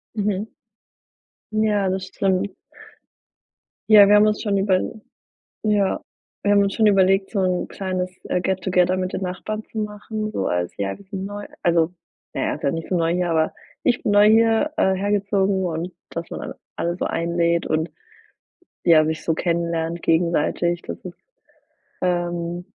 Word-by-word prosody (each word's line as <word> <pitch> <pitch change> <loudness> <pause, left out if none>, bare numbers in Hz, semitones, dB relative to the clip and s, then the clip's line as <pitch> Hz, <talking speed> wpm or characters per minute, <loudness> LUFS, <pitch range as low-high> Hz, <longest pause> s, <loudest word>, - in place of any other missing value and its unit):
Mhm. 205 -1 -1 1.1
Ja 210 -2 +2
das 185 0 -2
stimmt. 190 0 0 1.4
Ja 205 -2 +9
wir 205 - +6
haben 210 +1 +6
uns 210 0 0
schon 205 -3 0
überl 195 +3 0 0.6
ja, 205 -3 +1 0.4
wir 205 - +3
haben 200 0 +5
uns 200 -1 0
schon 220 -2 +3
überlegt 195 -1 +4
so 205 - -1
'n 185 -1 0
kleines, 185 -1 -3
äh, 180 - 0
get 190 +1 -1
together 180 0 +2
mit 185 0 -2
den - - -3
Nachbarn 215 +4 -4
zu 220 - -8
machen, 215 0 -4
so 95 - -2
als 90 0 -1
ja 100 -1 -2
wir 200 - -16
sind 195 -1 -5
neu, 205 +1 -6 0.2
also, 170 0 +2 0.4
na - - -2
ja - - -1
ist - - -10
ja 140 - +3
nicht 165 +1 -5
so 185 - 0
neu 165 0 +1
hier 180 -1 0
aber 160 -1 +1 0.3
ich 245 -1 +1
bin 205 - +1
neu 205 +1 +6
hier, 225 +6 +4
äh, 190 -12 +3
hergezogen 200 -1 +1
und 170 +1 -3 0.2
dass 165 0 -5
man - - -5
all - - -6 0.2
alle 175 +1 -1
so - - -2
einlädt 170 0 0
und, 160 +2 0 1.0
ja, 160 -2 +6
sich 160 0 -2
so 165 - +1
kennenlernt 170 0 -1
gegenseitig 170 +1 +1
das - - -6
ist, 175 - -8 0.9
ähm, 175 -1 -1
185 Hz, 170 wpm, -22 LUFS, 170-205 Hz, 1.4 s, Ja